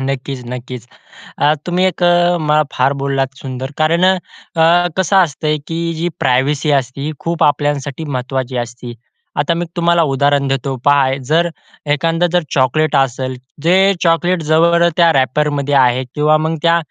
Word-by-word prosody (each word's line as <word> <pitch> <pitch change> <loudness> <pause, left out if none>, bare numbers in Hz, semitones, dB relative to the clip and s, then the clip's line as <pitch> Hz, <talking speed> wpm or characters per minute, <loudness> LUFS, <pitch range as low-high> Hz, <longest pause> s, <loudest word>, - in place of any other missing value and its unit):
नक्कीच-नक्कीच. 125 -2 -5 0.5
अ, 150 - +3
तुम्ही 180 +1 +1
एक 185 -1 -1
अ, 175 0 +3
म 150 0 +2
फार 130 +2 +1
बोललात 135 -1 -1
सुंदर 130 0 -6
कारण 165 +3 +2
अ, 175 -2 +1
कसं 190 +1 +2
असते, 155 -3 +1
की 165 0 -3
जी 165 +2 -2
प्रायव्हसी 140 +4 +1
असते 140 +4 -6
खूप 170 0 -1
आपल्यासाठी 145 0 0
महत्त्वाची 130 -2 -3
असती. 120 0 -10 0.5
आता 150 +4 +1
मी 170 +1 -2
तुम्हाला 170 -1 +2
उदाहरण 140 +1 +1
देतो. 135 0 -2
पहा, 140 -2 +4 0.2
जर 170 +2 +2 0.5
एखादं 165 +4 0
जर 175 - +2
चॉकलेट 150 +4 +1
असेल, 130 -1 0 0.3
जे 170 +4 +3 0.3
चॉकलेट 175 +1 +1
जवळ 170 +2 +3
त्या 170 -1 +5
रॅपरमध्ये 145 +2 0
आहे 130 -1 +3
किंवा 150 +1 +3
मग 160 +1 -1
त्या 170 +1 +3
150 Hz, 145 wpm, -16 LUFS, 135-170 Hz, 0.5 s, त्या